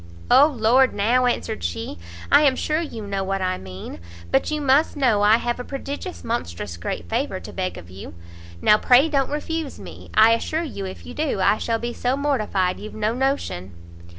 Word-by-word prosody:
"O 285 - +8
Lord, 255 -1 +3
now," 240 +5 +2
answered 110 - -2
she, 85 +1 -4 0.3
"I 285 - +7
am 275 -3 +4
sure 305 +4 -1
you 230 -10 -6
know 195 -1 -2
what 195 0 -2
I 185 -1 -1
mean; 95 -2 -9 0.3
but 135 - +2
you 305 - -1
must 285 +3 +3
know 240 -7 +3
I 210 +2 +6
have 240 +1 -2
a - - -4
prodigious 280 +7 -6
monstrous 85 - -4
great 85 0 -5
favour - - -2
to - - -10
beg - - -3
of 85 - -11
you; 95 -2 -10 0.5
now 210 - +6
pray 260 +5 +5
don't 275 -3 +1
refuse 300 0 -4
me; - - -11
I 220 +1 +7
assure 310 +8 0
you 200 - -5
if 185 - -9
you 245 - -8
do, 295 -8 -1
I 200 +3 +3
shall 230 -1 0
be 240 +1 -4
so 250 +3 -1
mortified 215 -10 0
you've 215 - -9
no 215 +1 0
notion." 250 - -2
235 Hz, 200 wpm, -23 LUFS, 195-275 Hz, 0.5 s, O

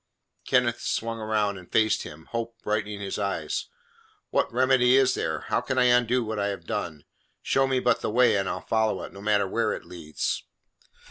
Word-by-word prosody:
Kenneth - - +2
swung 115 0 -2
round 105 -2 0
and 90 - -16
faced 110 -1 +3
him, 80 +1 -10
hope 115 0 -4
brightening 105 -1 -2
his 100 0 -4
eyes. 100 -1 -2 0.6
"What - - +1
remedy 130 +1 +4
is 135 -1 +4
there? 80 -2 -2
How - - -1
can 130 - -3
I 125 - +5
undo 125 0 +3
what 110 -1 -3
I 100 - +1
have 100 -1 -5
done? 75 -2 -4 0.4
Show 135 0 +2
me 130 -1 +1
but - - +2
the - - -1
way, 125 +2 +4
and 95 -1 0
I'll - - -5
follow 110 -3 +1
it, - - -9
no 100 - -10
matter 105 -1 +2
where - - 0
it - - -7
leads!" 80 -4 -3
110 Hz, 195 wpm, -26 LUFS, 100-125 Hz, 0.6 s, I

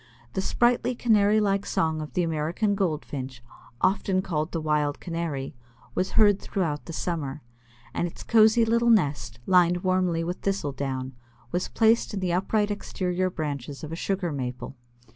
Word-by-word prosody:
The 190 - -1
sprightly 245 +4 +2
Canary 215 -3 +4
like 200 -1 +1
song 160 -4 0
of 150 -4 -7
the 180 - +1
American 165 +6 0
Goldfinch, 145 - -3 0.4
often 185 0 +2
called 155 -4 -2
the 165 - -2
Wild 150 -2 0
Canary, 165 -5 -4 0.4
was 185 - -1
heard 205 -3 +5
throughout 160 -7 -2
the - - -7
summer, 155 -4 -3 0.5
and 175 - 0
its 170 - -10
cozy 225 +1 +5
little 235 +1 +2
nest, 150 - +2
lined 180 -1 +4
warmly 185 -3 +1
with 175 +2 -3
thistle 195 -7 -1
down, 130 -1 -4 0.4
was 180 - -1
placed 225 -1 +2
in - - -2
the 180 -2 -1
upright 205 +3 +1
exterior 185 -2 -1
branches 145 -4 -5
of 155 - -6
a - - -3
Sugar 185 0 -2
Maple. 125 -1 -5
175 Hz, 160 wpm, -26 LUFS, 150-200 Hz, 0.5 s, heard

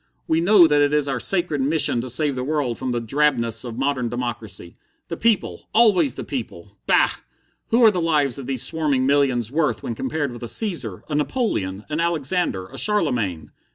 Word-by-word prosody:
We 160 +1 +1
know 185 0 +6
that 150 -2 +3
it 145 0 +2
is 150 -1 +2
our 135 -2 -2
sacred 170 -2 +1
mission 140 -4 +2
to 130 - -6
save 145 +4 +2
the 125 -1 -4
world 140 -4 -2
from 130 -1 -3
the 120 - -1
drabness 115 -2 0
of 120 -2 -7
modern 135 -3 -1
democracy. 115 -7 -5 0.4
The - - -3
people 225 -3 -1
always 185 - +4
the - - -6
people! 105 -7 -7
Bah! - - +4 0.6
what 235 +2 +3
are 220 - +7
the 180 -3 -2
lives 145 -6 +1
of 130 - -8
these 130 -3 -1
swarming 145 -5 0
millions 130 -5 +1
worth 140 - 0
when 115 - -3
compared 140 +4 -3
with 120 - -10
a 120 - -5
Caesar, 145 - -1
a 155 - -6
Napoleon, 145 - -2
an 155 +1 -3
Alexander, 165 - -1
a - - -3
Charlemagne? 125 - 0
140 Hz, 190 wpm, -22 LUFS, 120-160 Hz, 0.6 s, are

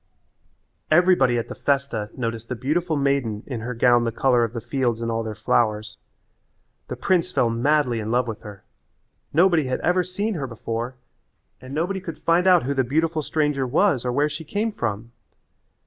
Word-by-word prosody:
Everybody 155 -7 +4
at 115 - -2
the - - -6
festa 140 -7 -1
noticed 115 -2 -4
the 125 - -2
beautiful 155 +7 -1
maiden 140 -7 0
in 125 -5 -5
her 120 +2 -5
gown 120 0 +4
the 115 - -1
colour 120 +1 +2
of 115 -1 -2
the 115 - -3
fields 120 -1 -1
and 115 0 -2
all 115 0 -1
their 110 -1 -5
flowers. 110 0 0 0.9
The - - -5
prince 180 -1 +1
fell 120 -9 +2
madly 125 0 +1
in 110 0 -4
love 125 +1 +1
with 110 -2 -5
her. 100 -2 -11 0.7
Nobody 170 -1 +4
had 130 - -1
ever 180 +1 +2
seen 200 +5 -3
her 145 -7 -3
before 115 +1 -4 0.7
and 130 +2 -8
nobody 180 +5 -1
could 165 -3 -7
find 175 +2 +2
out 180 -6 +6
who 140 +3 -1
the 135 -1 +1
beautiful 160 +5 0
stranger 150 -3 0
was 145 - +2
or 125 - -1
where 145 +4 +2
she 150 +2 -6
came 210 +8 -2
from. 115 - -4
130 Hz, 185 wpm, -23 LUFS, 115-160 Hz, 0.9 s, out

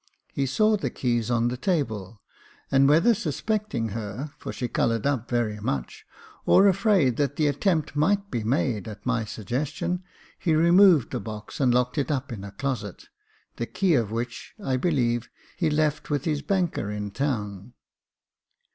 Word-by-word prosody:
He 135 -1 0
saw 215 - +3
the - - -2
keys 120 -3 -1
on 120 0 +2
the 125 - -4
table, 115 - -2 0.5
and 135 0 +5
whether 165 +11 +5
suspecting 205 - -2
her, 110 +7 -5
for - - -5
she 125 - -3
coloured 115 -2 0
up 130 -5 0
very 115 -4 0
much, 70 - -4 0.4
or 195 - +6
afraid 190 - +3
that 145 -1 0
the 155 - +1
attempt 155 +2 0
might 200 +7 +1
be 115 - -2
made 115 - 0
at 105 -2 -9
my 115 -4 0
suggestion, 150 - -3 0.4
he 160 -3 +1
removed 170 - +5
the 125 - -2
box 105 0 -8
and 130 -3 +3
locked 125 +3 +1
it 135 - -1
up 140 -2 -2
in 100 -3 -7
a 100 - -6
closet, 120 -7 -4 0.5
the 120 - -3
key 190 -3 +1
of 115 -7 +2
which, 120 +2 -5
I 135 -11 -1
believe, 125 -5 0 0.3
he 170 -3 +1
left 150 +1 0
with 145 -2 -1
his 150 -3 0
banker 180 - -1
in 105 -1 -4
town. 105 -4 -3
130 Hz, 165 wpm, -26 LUFS, 115-160 Hz, 0.5 s, or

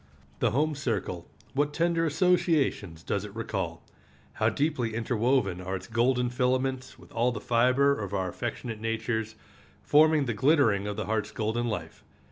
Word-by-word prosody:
The - - +3
home 150 +5 +1
circle, 110 - -3 0.3
what 145 +1 0
tender 170 -1 +2
associations 155 - +1
does 100 - -2
it 105 -1 -9
recall! 85 -7 -4 0.5
How - - +2
deeply 135 -7 -1
interwoven 115 -4 +1
are 95 +1 -3
its 95 - -6
golden 120 +2 +1
filaments 130 +1 -1
with - - -17
all 120 +2 +1
the 110 - -5
fiber 125 +5 +3
of 100 -3 -4
our 95 -2 -1
affectionate 115 +2 -5
natures, 110 0 -2 0.5
forming 155 -1 +4
the 120 - -1
glittering 115 -6 +3
of 105 - -3
the 110 - -2
heart's 110 0 -1
golden 115 +1 -2
life! 90 -8 -5
120 Hz, 155 wpm, -28 LUFS, 105-140 Hz, 0.5 s, forming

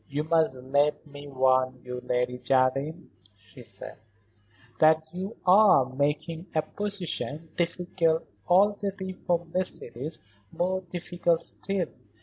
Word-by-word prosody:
"You 145 +2 -1
must 160 -4 +2
let 145 +4 +1
me 145 -1 -11
warn 130 -1 +2
you, 125 0 -5
Lady 125 0 -1
Jardine," 135 +6 0 0.3
she 100 -3 -16
said, - - -9 0.8
"that 160 0 +5
you 190 +4 -5
are 185 -8 +6
making 150 +5 -1
a 155 - +2
position, 175 -5 -3
difficult 170 -1 0 0.2
already 195 0 +2
for 175 -1 -1
Mercedes, 160 - -3 0.3
more 185 +1 -1
difficult 175 -1 0
still. 195 -4 -1
160 Hz, 115 wpm, -27 LUFS, 135-180 Hz, 0.8 s, are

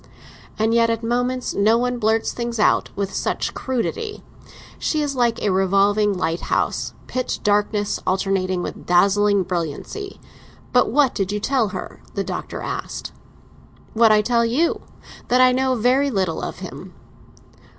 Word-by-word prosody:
"And 220 +1 +1
yet 230 0 +4
at 230 0 -1
moments 245 +2 -1
no 215 +3 +3
one 245 0 -1
blurts 220 0 +1
things 235 -1 -4
out 210 - +3
with 200 -1 -3
such - - -2
crudity. 420 - -3 0.6
She 310 -1 0
is 285 -2 -2
like 240 -2 +1
a 205 - +2
revolving 200 +2 +3
lighthouse; 165 -1 -1
pitch 255 -1 -3
darkness 205 0 +1
alternating 185 -1 0
with - - -4
a - - -12
dazzling 200 +2 +3
brilliancy! 180 - -4 0.5
But 250 - +4
what 275 0 +3
did 195 -1 -2
you 210 - -1
tell 250 0 +1
her?" 195 -1 -7
the 200 - 0
Doctor 180 -1 -5
asked. - - -5 0.8
"What 225 0 +5
I 210 0 +4
tell 235 +1 +2
you; 260 +9 +1 0.5
that 250 - +3
I 255 0 +6
know 260 0 +1
very 255 +5 +2
little 190 -8 -1
of - - -6
him." - - -10
220 Hz, 150 wpm, -21 LUFS, 195-250 Hz, 0.8 s, I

